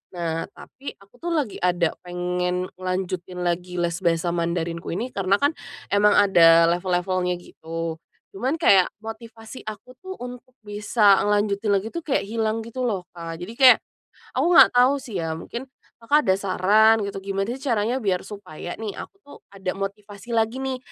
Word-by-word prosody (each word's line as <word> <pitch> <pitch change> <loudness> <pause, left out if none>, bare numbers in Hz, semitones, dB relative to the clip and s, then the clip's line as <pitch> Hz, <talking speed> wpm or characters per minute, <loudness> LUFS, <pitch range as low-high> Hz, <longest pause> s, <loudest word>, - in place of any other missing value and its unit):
Nah, 165 -1 -2
tapi 275 +2 -10
aku 200 +5 -23
tuh 340 - -6
lagi 280 -10 -2
ada 175 -2 +1
pengen 180 0 -2
ngelanjutin 185 -1 -3
lagi 180 +1 -2
les 170 0 -1
bahasa 170 -1 +1
Mandarinku 170 0 -2
ini, 240 +7 -3
karena 195 0 +1
kan 285 +8 +2 0.4
emang 205 +1 +4
ada 165 -3 +6
level-levelnya 180 0 0
gitu, 165 -1 -6 0.3
cuman 255 +10 -1
kayak 195 - +5 0.2
motivasi 225 +1 -9
aku 215 +3 -8
tuh 375 0 -8
untuk 250 0 -10
bisa 205 -1 +3
ngelanjutin 205 0 0
lagi 205 +3 -2
tuh 335 - -4
kayak 310 -4 -1
hilang 220 +1 -1
gitu 240 +3 -5
loh 195 -6 -2
Kak. 165 -1 -7
Jadi 225 +7 -9
kayak, 260 -2 +8 0.6
aku - - +2
nggak 350 - +9
tahu 250 +2 +4
sih 230 -6 -8
ya, 165 -2 -2
mungkin 235 +10 -6 0.3
Kakak 285 +6 +2
ada - - +5
saran 210 +3 +4
gitu 200 -1 -4
gimana 195 +2 -3
sih 250 - -4
caranya 230 0 +1
biar 195 -7 -1
supaya 185 -5 -8
nih, 215 -2 -5
aku - - -10
tuh 285 - -13
ada 195 -2 -4
motivasi 200 +2 -7
lagi 230 +3 0
nih, 265 -1 -2
200 Hz, 165 wpm, -23 LUFS, 180-225 Hz, 0.6 s, nggak